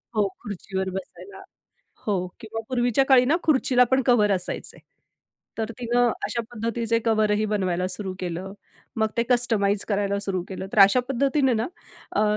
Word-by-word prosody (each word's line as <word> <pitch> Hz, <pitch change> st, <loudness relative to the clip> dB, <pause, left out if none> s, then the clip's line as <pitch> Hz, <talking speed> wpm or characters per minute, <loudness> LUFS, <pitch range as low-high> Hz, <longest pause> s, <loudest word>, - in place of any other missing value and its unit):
हो, 210 Hz, -2 st, +3 dB
खुर्चीवर 190 Hz, -2 st, -4 dB
बसायला. 190 Hz, -, -8 dB, 0.7 s
हो 185 Hz, -3 st, 0 dB
किंवा 225 Hz, 0 st, -5 dB
पूर्वीच्या 245 Hz, +1 st, +2 dB
काळी 260 Hz, -2 st, +6 dB
ना 290 Hz, +6 st, +3 dB
खुर्चीला 260 Hz, -4 st, +3 dB
पण 260 Hz, 0 st, +3 dB
कव्हर 220 Hz, -5 st, +4 dB
असायचे. 180 Hz, -1 st, -3 dB, 0.8 s
तर 225 Hz, 0 st, -2 dB
तिनं 245 Hz, 0 st, +2 dB, 0.2 s
अशा 235 Hz, -, -2 dB
पद्धतीचे 230 Hz, 0 st, -1 dB
कव्हरही 215 Hz, -1 st, +2 dB
बनवायला 185 Hz, -4 st, 0 dB
सुरू 190 Hz, 0 st, -4 dB
केलं. 180 Hz, +2 st, -4 dB, 0.4 s
मग 220 Hz, 0 st, +2 dB
ते 235 Hz, -, +3 dB
कस्टमाइज 215 Hz, -5 st, +2 dB
करायला 200 Hz, -1 st, 0 dB
सुरू 190 Hz, -3 st, -2 dB
केलं. 190 Hz, 0 st, -6 dB
तर -, -, -1 dB
अशा 200 Hz, +6 st, +5 dB
पद्धतीने 270 Hz, +1 st, +2 dB
ना 225 Hz, +2 st, 0 dB, 0.5 s
अ, 210 Hz, -, +3 dB
220 Hz, 150 wpm, -24 LUFS, 195-245 Hz, 0.8 s, काळी